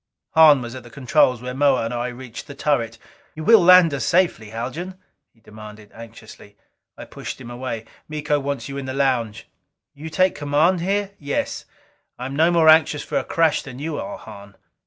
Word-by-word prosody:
Hahn 150 -5 +6
was 120 0 -7
at 130 - -8
the 120 - -14
controls 125 0 +1
when 125 +1 -6
Moa 140 -5 +3
and 115 - -4
I 120 +1 -2
reached 125 -1 -9
the 140 - -10
turret. 120 -6 -1 0.4
"You 155 - -7
will 225 +6 +7
land 180 -2 +6
us 135 - -2
safely, 170 - +1
Haljan?" 155 - -6 0.3
he 115 - -31
demanded 105 -1 -13
anxiously. 115 -2 -13 0.4
I - - -9
pushed - - -8
him 120 -2 -10
away. 120 -2 -5 0.2
"Miko 150 -1 -1
wants 140 0 -4
you 140 0 -7
in 135 - -7
the 130 0 -5
lounge." 125 -6 -1 0.5
"You 150 +3 -9
take 185 +3 +2
command 155 +5 +1
here?" 200 +2 -1
"Yes. 145 -1 -3 0.5
I 125 - -6
am 135 +1 -5
no 160 +3 +4
more 170 -2 +3
anxious 155 -2 +5
for - - -2
a - - -5
crash 165 -2 +1
than 130 -2 -10
you 150 +2 -4
are, 200 0 -6
Hahn." 100 -2 -13
140 Hz, 195 wpm, -21 LUFS, 120-160 Hz, 0.5 s, will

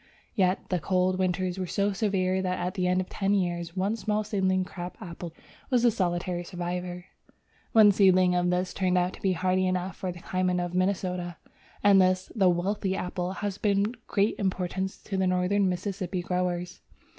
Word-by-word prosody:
Yet 185 -3 +1
the 180 - +1
cold 185 +1 +1
winters 185 0 0
were 185 - -2
so 200 +2 0
severe 190 -3 0
that 185 -1 -1
at 180 +1 -2
the 180 -2 0
end 180 +1 +2
of 185 - -6
ten 200 0 0
years 175 -2 -2
one 195 +4 +1
small 215 -1 -1
seedling 190 -3 0
crab 180 0 -7
apple 170 -1 -7 0.4
was 250 -3 +2
the 240 - +5
solitary 175 -3 -1
survivor. 180 0 -5 0.7
One 215 -2 +8
seedling 185 -2 +4
of 180 0 +2
this 180 +1 0
turned 185 -1 +1
out 180 +1 +1
to - - -12
be 190 -1 +2
hardy 185 +2 +1
enough 185 -1 -1
for 185 - -4
the 175 - -10
climate 185 0 0
of 175 0 -3
Minnesota, 180 -2 -1 0.5
and 200 -2 +7
this, 185 0 +1
the 195 -5 +4
"wealthy" 190 +2 0
apple, 180 -1 -3
has 200 0 -4
been 200 -1 +2
of 240 -1 -14
great 205 +1 +2
importance 190 0 -2
to 195 - -3
the 190 0 +2
Northern 185 +2 +2
Mississippi 185 0 -3
growers. 180 0 -2
185 Hz, 185 wpm, -27 LUFS, 180-195 Hz, 0.7 s, One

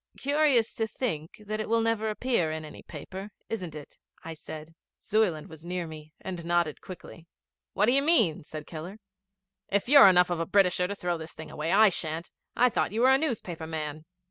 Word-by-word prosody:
'Curious 285 -5 +2
to 225 - -1
think 210 - -4
that 215 +1 -3
it 215 - -3
will 230 0 +3
never 225 -1 0
appear 215 -6 0
in 155 0 -5
any 150 - -11
paper, 190 +6 -8 0.2
isn't 180 -8 -4
it? 150 -2 -11 0.3
'I 165 - -5
said. 155 0 -10 0.2
Zuyland 195 -8 +1
was 160 -1 -13
near 175 0 -3
me, 155 -1 -10
and 185 -2 -5
he 170 - -8
nodded 170 -3 +1
quickly. 170 -2 -11 0.5
'What 200 - +3
do 235 - +3
you 275 +2 +4
mean?' 255 - +3
said 155 0 -8
Keller. 170 +5 -8 0.7
'If 200 +2 0
you're 280 -5 +9
enough 180 -1 +5
of 175 - -1
a 165 - -2
Britisher 180 -2 +3
to 200 - -4
throw 175 -3 -2
this 160 0 -8
thing 160 0 -9
away, 155 +2 -3
I 215 +2 +7
shan't. 165 -2 -4 0.2
I 250 - +5
thought 235 - 0
you 220 +3 -1
were 260 +2 +6
a 265 - +6
newspaper 190 - -3
man.' 155 -1 -5
180 Hz, 205 wpm, -28 LUFS, 160-220 Hz, 0.7 s, you're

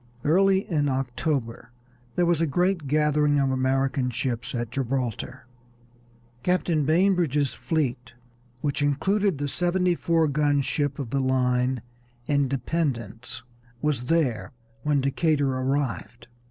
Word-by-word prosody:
Early 190 +5 +3
in 145 -4 +1
October 130 -2 -2 0.4
there 175 - +2
was 170 -2 +2
a 165 - +2
great 175 +1 0
gathering 150 0 +2
of 135 -1 +2
American 130 0 +1
ships 125 0 -3
at 120 -1 -3
Gibraltar. 130 -3 -3 1.0
Captain 170 -1 +1
Bainbridge's 160 -4 +2
fleet, 125 -7 -2 0.5
which 145 -1 -1
included 190 +6 +1
the 145 +1 -2
seventy 180 +4 +1
four 165 -1 +1
gun 145 -1 +2
ship 145 0 -1
of 135 -6 -5
the 140 - +1
line 125 -1 +1 0.4
Independence, 130 -4 -2 0.4
was 135 -3 -1
there 145 -5 0 0.3
when 145 0 +1
Decatur 140 0 +1
arrived. 130 -3 -2
140 Hz, 115 wpm, -25 LUFS, 130-160 Hz, 1.0 s, Early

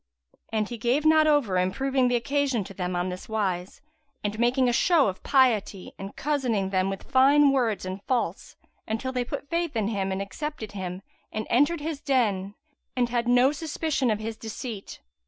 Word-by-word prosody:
And 215 -1 0
he 240 0 -7
gave 250 +7 +1
not 310 0 +5
over 260 -12 +3
improving 260 +8 +1
the 245 - +2
occasion 270 -1 0
to 195 - -10
them 180 -1 -3
on 175 +1 -1
this 180 +3 -7
wise, 190 -4 -2 0.4
and 210 +1 -3
making 250 +2 +3
a 245 - +2
show 320 0 +4
of 190 -1 -4
piety 225 -8 +2
and 195 +1 -7
cozening 250 -10 -1
them 185 0 +1
with 195 -1 -5
fine 275 +2 +5
words 235 -8 0
and 185 +1 -5
false 255 -2 -2 0.3
until 225 +4 -2
they 250 -1 -1
put 250 - -6
faith 335 -4 -1
in 215 -2 0
him 195 -3 -1
and 190 - -2
accepted 220 +3 -5
him 185 -1 -6 0.3
and 215 0 -3
entered 290 +6 +3
his 310 -1 -4
den 210 -8 0 0.4
and 245 -2 +1
had 240 0 -1
no 250 +2 +5
suspicion 300 -3 -1
of 215 - +1
his 220 +1 -5
deceit. 220 -2 -7
235 Hz, 185 wpm, -26 LUFS, 200-275 Hz, 0.4 s, not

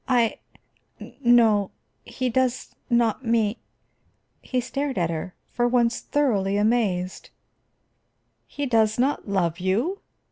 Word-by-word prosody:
"I 240 -3 +2 0.8
no 225 -5 +4 0.3
he 255 - -3
does 255 +1 -1 0.2
not 235 0 +1
me 230 -2 +1 0.4
" - - -44
He 255 - +2
stared 275 +1 -3
at 170 -2 0
her, 165 +3 -5 0.2
for 240 0 +1
once 240 -1 +2
thoroughly 205 -9 0
amazed. 205 -5 0 1.2
"He 285 - -4
does 220 -4 +2
not 260 -3 0
love 175 -3 0
you?" 230 - 0
230 Hz, 115 wpm, -24 LUFS, 200-255 Hz, 1.2 s, no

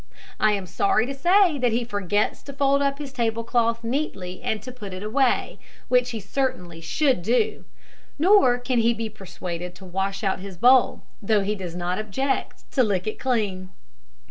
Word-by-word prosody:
I 215 -1 +4
am 200 -2 -2
sorry 390 - +1
to 275 - -4
say 350 +2 +3
that 245 -2 +2
he 235 +2 0
forgets 205 -1 -1
to 280 - -9
fold 275 0 +2
up 280 0 +1
his 280 -2 -7
table 230 -2 -1
cloth 230 -1 +1
neatly 230 -8 -3
and 220 - -1
to 255 - -7
put 205 -7 -8
it 185 - -7
away, 250 +4 +1 0.3
which 250 0 +3
he 230 -2 -4
certainly 190 -6 -3
should 260 - +1
do; 250 - 0 0.5
nor 330 -6 +5
can 245 0 0
he 230 +1 +3
be 225 0 -3
persuaded 180 -3 -7
to 190 +1 -12
wash 195 +2 -3
out 195 -2 0
his 190 -1 -9
bowl, 250 +5 +4 0.2
though 210 0 +2
he 200 +2 -1
does 185 -4 -6
not 180 +2 -2
object 240 +6 -2
to 265 - +2
lick 200 -5 +1
it 215 - -4
clean. 205 -8 -1
225 Hz, 185 wpm, -24 LUFS, 195-265 Hz, 0.5 s, nor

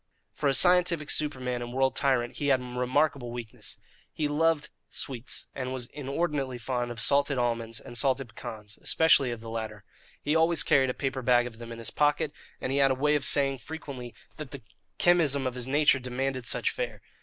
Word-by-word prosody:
For 145 - 0
a 135 - +2
scientific 175 -2 +4
superman 130 -5 -1
and 120 0 -6
world 135 0 +1
tyrant, 130 -4 +1
he 145 - -1
had 135 -2 +4
remarkable 125 +1 0
weaknesses. 120 -2 -8 0.3
He 150 - -1
loved 155 +1 +1 0.2
sweets, 130 -2 -4
and 130 -1 -4
was 130 -2 -3
inordinately 140 -1 -2
fond 120 +1 -2
of 120 -1 -6
salted 140 +2 +3
almonds 115 -2 -1
and 120 - -11
salted 130 0 +1
pecans, 105 -1 -7
especially 155 -5 +4
of 120 -2 -5
the 115 - -8
latter. 110 -2 -5 0.4
He 150 +2 0
always 160 -1 +3
carried 130 -2 +3
a 125 - -2
paper 135 -1 -2
bag 120 -1 +4
of 115 -2 -8
them 115 0 -8
in 115 - -7
his 115 - -5
pocket, 150 +1 +1 0.3
and 130 - -3
he 140 - +1
had 135 -1 +5
a 130 - +2
way 150 +3 +2
of 145 -2 +1
saying 135 -1 +4
frequently 135 -4 -8 0.2
that 150 -3 -7
the 135 -3 -9 0.3
chemism 155 -6 +3
of 130 - -1
his 125 0 -3
nature 145 0 +4
demanded 130 0 -2
such - - +1
fare. - - -5
130 Hz, 195 wpm, -28 LUFS, 120-145 Hz, 0.4 s, had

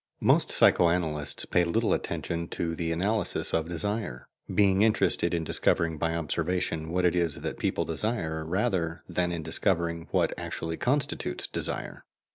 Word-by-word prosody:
Most - - +4
psycho 85 - +5
analysts 80 -4 -1
pay 90 - +2
little 85 0 +1
attention 85 0 -3
to 85 -1 -3
the 80 0 -2
analysis 100 +7 0
of 80 0 0
desire, 100 - -3 0.3
being 100 -1 +3
interested 110 0 +3
in 85 -1 0
discovering 80 0 0
by 80 +1 0
observation 85 0 -1
what 90 +2 +1
it 85 - +4
is 85 -4 +1
that - - -4
people - - 0
desire, 80 -3 -2
rather 90 -1 -1
than 90 -1 -1
in 85 -2 -3
discovering 85 -2 0
what - - +1
actually 80 0 -4
constitutes 140 +3 -1
desire. - - -4
85 Hz, 150 wpm, -28 LUFS, 80-95 Hz, 0.3 s, psycho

